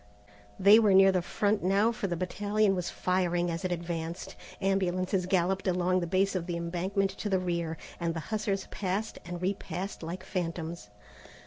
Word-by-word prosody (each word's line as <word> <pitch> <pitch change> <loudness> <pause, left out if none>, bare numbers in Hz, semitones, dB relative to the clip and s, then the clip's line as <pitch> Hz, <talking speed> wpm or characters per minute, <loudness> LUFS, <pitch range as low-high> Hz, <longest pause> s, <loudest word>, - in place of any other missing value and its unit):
They 200 +3 +8
were 210 -4 +4
near 195 0 +7
the 185 -1 +1
front 205 +4 0
now 200 +5 +3
for 225 -3 -3
the 175 -2 -2
battalion 205 +3 +1
was 180 -2 -2
firing 175 -1 0
as 165 +3 -4
it 185 - -1
advanced. 170 +2 -4 0.2
Ambulances 185 -1 0
galloped 185 +1 +1
along 185 0 +2
the 175 - -2
base 195 +3 +2
of 180 -2 -2
the 175 -1 -2
embankment 185 +4 -1
to 205 +2 -5
the 190 - +3
rear, 170 -3 -2 0.2
and 170 -1 -1
the - - -2
hussars 205 -2 -1
passed 200 +3 -2
and 175 0 -5
repassed 190 +1 -3
like 170 +3 -5
phantoms. 170 - -4
185 Hz, 175 wpm, -29 LUFS, 175-195 Hz, 0.2 s, They